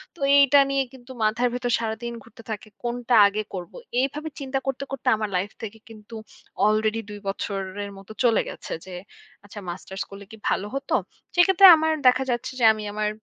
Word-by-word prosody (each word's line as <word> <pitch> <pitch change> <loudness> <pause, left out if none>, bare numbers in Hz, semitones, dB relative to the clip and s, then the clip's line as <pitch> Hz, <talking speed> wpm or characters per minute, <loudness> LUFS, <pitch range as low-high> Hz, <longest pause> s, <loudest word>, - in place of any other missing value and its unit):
তো - - -19 0.2
এইটা 280 0 +6
নিয়ে 275 -1 +1
কিন্তু 260 0 -13
মাথার 235 +3 +2
ভেতর 245 -1 -2
সারাদিন 230 +1 -4
ঘুরতে 230 +1 -16
থাকে। 215 0 -6 0.2
কোনটা 240 0 0
আগে 210 +2 -2
করব। 180 -2 -6 0.3
এইভাবে 295 +4 -2
চিন্তা 270 -1 -2
করতে, 270 0 -2
করতে 270 -2 -6
আমার 215 -1 -3
লাইফ 195 +3 -3
থেকে 220 +1 -7
কিন্তু 220 +1 -12 0.5
আলরেডি 215 +1 +1
২ 205 0 -8
বছরের 195 0 -4
মতো 195 +2 -13
চলে 230 -2 +4
গেছে - - -7
যে 185 - -10 0.5
আচ্ছা 205 +1 -10
মাস্টার্স 190 +2 -6
করলে 200 0 -11
কি 220 - -11
ভালো 205 - -1
হত। 275 - -5 0.5
সেক্ষেত্রে 380 +2 +6
আমার 315 0 +1
দেখা 255 +1 +5
যাচ্ছে 240 +2 -2
যে 230 - +4
আমি 215 -1 -6
আমার 210 0 0
225 Hz, 180 wpm, -24 LUFS, 205-260 Hz, 0.5 s, এইটা